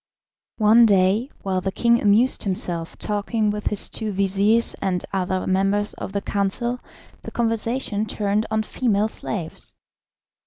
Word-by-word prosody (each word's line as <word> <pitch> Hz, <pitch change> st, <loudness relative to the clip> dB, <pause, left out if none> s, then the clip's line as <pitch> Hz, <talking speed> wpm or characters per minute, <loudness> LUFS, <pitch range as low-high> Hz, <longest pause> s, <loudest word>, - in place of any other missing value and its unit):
One 225 Hz, +2 st, +6 dB
day, 200 Hz, +5 st, +2 dB
while 190 Hz, -1 st, -1 dB
the 190 Hz, -, -2 dB
king 235 Hz, +3 st, +2 dB
amused 215 Hz, +5 st, +4 dB
himself 175 Hz, -4 st, -1 dB
talking 210 Hz, +1 st, -1 dB
with 210 Hz, 0 st, -4 dB
his 210 Hz, -, +1 dB
two 220 Hz, -2 st, -4 dB
vizirs 200 Hz, +4 st, +2 dB
and 180 Hz, -2 st, -1 dB
other 185 Hz, -1 st, -1 dB
members 195 Hz, +2 st, +1 dB
of -, -, -7 dB
the 200 Hz, 0 st, -2 dB
council, 235 Hz, +5 st, -2 dB, 0.4 s
the -, -, -8 dB
conversation 230 Hz, -1 st, -2 dB
turned 210 Hz, +1 st, -1 dB
on 220 Hz, 0 st, 0 dB
female 215 Hz, -2 st, 0 dB
slaves. 175 Hz, -7 st, -6 dB
205 Hz, 140 wpm, -22 LUFS, 195-225 Hz, 0.4 s, One